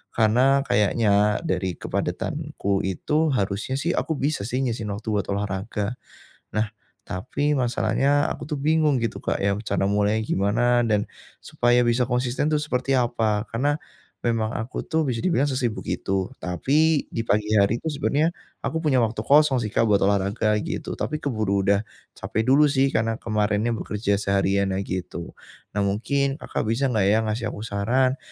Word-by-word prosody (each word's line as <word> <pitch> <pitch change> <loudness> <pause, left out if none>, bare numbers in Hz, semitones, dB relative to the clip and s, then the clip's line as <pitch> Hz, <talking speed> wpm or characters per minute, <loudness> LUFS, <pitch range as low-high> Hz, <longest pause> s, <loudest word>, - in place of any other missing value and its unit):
karena, 125 +5 +4
kayaknya 105 0 +3
dari 95 - -1
kepadatanku 100 -1 -2
itu 150 - 0
harusnya, 105 +3 -1
sih, 170 +5 0
aku 160 - 0
bisa, 145 -6 -1
sih, 125 +2 -1
nyisihin 115 -4 -2
waktu 105 +2 -8
buat 100 -1 +1
olahraga. 100 +2 -3 0.6
Nah, 110 +1 +1 0.4
tapi, 140 +10 -1
masalahnya 130 +4 +1
aku, - - -6
tuh, 150 -3 -2
bingung, 155 -1 +3
gitu, 115 - -2
Kak, - - -1
ya, 100 0 +2
rencana 105 -2 -1
mulainya 105 +2 +1
gimana 120 +5 +2
dan 105 -2 +1 0.4
supaya 120 0 +2
bisa 120 +2 +2
konsisten, 125 +3 0
tuh, 150 - +2
seperti 135 -2 -2
apa? 115 -3 0
Karena, 145 +6 0 0.5
memang 115 -2 0
aku, 115 +3 -4
tuh, 160 -1 0
bisa 120 -3 -1
dibilang 170 -6 +2
sesibuk 125 -5 -2
itu. 95 -1 -1 0.2
Tapi, 145 - +2
di 115 - -2
pagi 105 +1 +1
hari 105 +3 +3
itu - - -5
sebenarnya 150 +2 +1 0.3
aku 160 - -2
punya 140 -5 +3
waktu 115 -1 0
kosong, 145 -1 +5
sih, 105 - -4
Kak, 115 - +3
buat 100 -1 +3
olahraga, 100 +2 +1
gitu. - - -4
Tapi, 155 - -2
keburu 110 -7 0
udah 100 0 +3 0.4
capek 110 - -2
dulu, 150 +2 +6
sih, 135 -1 +2
karena 115 0 +1
kemarinnya 105 +1 0
bekerja 105 -1 -1
seharian, 100 -1 +1
nah, 95 - -1
gitu. 90 -2 -5 0.4
Nah, 100 - 0
mungkin 135 +7 0
Kakak - - -3
bisa 130 +4 +1
enggak, 105 -5 +2
ya, 105 +2 +4
ngasih 110 +1 -2
aku 105 - -7
saran 125 +6 +1
115 Hz, 165 wpm, -24 LUFS, 105-135 Hz, 0.6 s, dulu